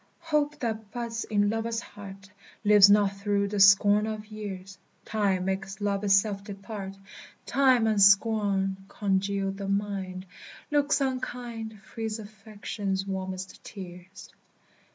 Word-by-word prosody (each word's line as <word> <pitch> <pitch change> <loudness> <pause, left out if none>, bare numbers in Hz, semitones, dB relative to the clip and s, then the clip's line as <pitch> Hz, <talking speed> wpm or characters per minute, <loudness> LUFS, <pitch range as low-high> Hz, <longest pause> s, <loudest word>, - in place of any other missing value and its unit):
Hope, 300 -2 0
that 220 -3 -3
buds 230 -1 -4
in 205 -1 +1
lover's 225 0 -2
heart, 200 -3 -11 0.3
Lives 205 -1 +8
not 205 -1 +5
through 200 0 0
the 205 0 -2
scorn 205 +2 +6
of 215 -1 -5
years; 200 -3 -8 0.3
Time 195 -4 0
makes 190 +1 -3
love 200 -1 -1
itself 200 0 +2
depart; 195 -1 -7 0.5
Time 260 -3 +3
and 215 -2 +2
scorn 200 -1 +4
congeal 195 -1 -1
the 195 0 -6
mind, 195 -2 -3 0.5
Looks 290 -1 +2
unkind 240 -5 -4
Freeze 225 -1 -5
affection's 205 -2 -5
warmest 190 -1 -5
tears. 185 0 -11
205 Hz, 120 wpm, -27 LUFS, 195-220 Hz, 0.5 s, Lives